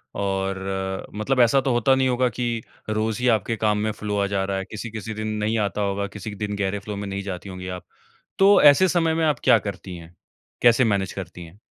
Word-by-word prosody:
और, 95 -1 -2
मतलब 125 +5 0
ऐसा 125 +3 +4
तो 135 - 0
होता 120 +3 +3
नहीं 130 0 +2
होगा 125 0 +2
की 120 -1 -2 0.3
रोज़ 110 +1 -1
ही 125 - +1
आपके 110 +2 -2
काम 105 -1 +1
में 110 +1 0
फ़्लो 105 -1 -4
आ 100 - +1
जा 100 -1 -1
रहा 95 0 -2
है, 95 - -4
किसी-किसी 110 +1 -6
दिन 110 0 -4 0.2
नहीं 110 +2 0
आता 105 0 -1
होगा, 100 0 -1
किसी 105 +1 -8
दिन 105 0 -3
गहरे 100 0 -1
फ़्लो 105 +1 -6
में 100 0 -5
नहीं 100 0 -4
जाती 95 0 -6
होंगी 90 0 -7
आप। - - -27 0.5
तो 200 +1 +6
ऐसे 150 +6 +7
समय 165 -2 +2
में 160 0 +1
आप 150 -2 +1
क्या 115 - +6
करती 95 -2 -7
हैं? 85 +1 -14 0.5
कैसे 120 +1 +5
मैनेज 100 -3 0
करती 90 -2 -8
हैं? 85 +6 -16
105 Hz, 225 wpm, -23 LUFS, 95-120 Hz, 0.5 s, ऐसे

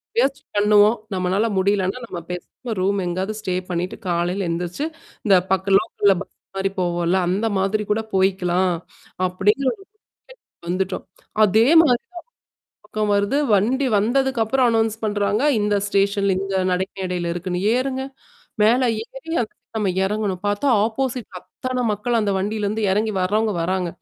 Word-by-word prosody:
முயற்சி 275 -10 +1
பண்ணுவோம். 210 +2 +5 0.2
நம்மனால 190 +4 +1
முடியலன்னா 195 +2 +1
நம்ம 175 -6 -6
பேசாம 200 +6 -6
ரூம் 200 +2 +1
எங்கயாவது 185 +4 -2
ஸ்டே 185 -3 -2
பண்ணிட்டு 180 +1 -2
காலையில 175 +2 0
எழுந்திரிச்சு, 175 - -2 0.4
இந்த 195 -2 +6 0.2
பக்க 190 +1 +1
லோக்க 210 0 -5
இல்ல 195 - +7
பஸ் 200 - -10 0.2
மாரி 195 0 0
போவோம்ல. 175 0 +1
அந்த 200 +5 0
மாதிரி 200 +3 0
கூட 220 +1 +2
போய்கலாம். 185 -1 +2 0.5
அப்படிங்கிற 205 +9 +1
ஒரு - - -15
முடிவுக்கு 425 - -21
வந்துட்டோம். 185 +1 -2 0.4
அதே 220 +4 +4
மாரி 250 -7 +3 0.7
தான். - - -85
தக்கம் 210 -1 -1
வருது. 200 +8 +1 0.2
வண்டி 255 +7 +2
வந்ததுக்குப்புறம் 250 +2 +2
அனவுன்ஸ் 225 -1 +1
பண்றாங்க. 205 +1 0 0.2
இந்த 205 0 +1
ஸ்டேஷன்ல 200 -1 +1
இந்த 195 0 -3 0.2
நடைக்க 190 +2 -1
மேடையில 180 -2 -2
இருக்குன்னு 180 +1 -3
ஏறுங்க. 265 +1 -1 0.6
மேல 245 +4 +4 0.2
ஏறி 325 +5 -9
அ - - 0 0.3
நம்ம 205 -2 0 0.2
எறங்கணும். 200 -2 -1
பார்த்தா 205 +7 0 0.2
ஆப்போசிட் 250 +1 -2
-ல 180 - -6
அத்தா 255 -1 -4
மக்கள் 230 +3 0
அந்த 205 -1 0
வண்டியிலருந்து 210 +2 -2
எறங்கி 215 +2 0
வறவங்க 210 +3 +1
வராங்க. 185 0 -1
205 Hz, 145 wpm, -22 LUFS, 185-225 Hz, 0.7 s, இல்ல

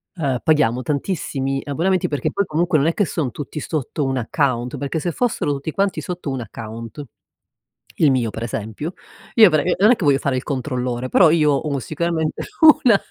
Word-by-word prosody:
uhm, 135 -7 -1
paghiamo 130 -6 +2
tantissimi 135 -2 -2
abbonamenti. 175 +6 0
Perché 145 -4 -2
poi, 200 0 0
comunque, 165 0 +1
non 145 +3 +2
è 165 - +2
che 205 - +1
son' 150 -7 -2
tutti 145 +4 -6
sotto 150 0 -3
un 135 -1 -1
account. 125 0 -1
Perché 145 +3 -3
se 175 +2 -2
fossero 230 -8 -1
tutti 140 +3 -4
quanti 195 +2 -1
sotto 175 -5 -5
un 130 -2 -3
account, 115 +3 -8 1.0
il 145 -3 +6
mio, 120 -4 +1
per 110 +2 -6
esempio, 115 - -5 0.4
io 220 -5 +8
per 155 -2 +2
non 210 +5 +5
è - - +5
che 180 - -3
voglio 140 -1 +4
fare 135 -3 -1
il 125 - -3
controllore, 125 -3 -3
però 170 -4 +6
io 155 -3 +3
ho 140 0 -1
sicuramente 160 +2 -2 0.4
una 225 -6 +6
145 Hz, 190 wpm, -20 LUFS, 130-165 Hz, 1.0 s, io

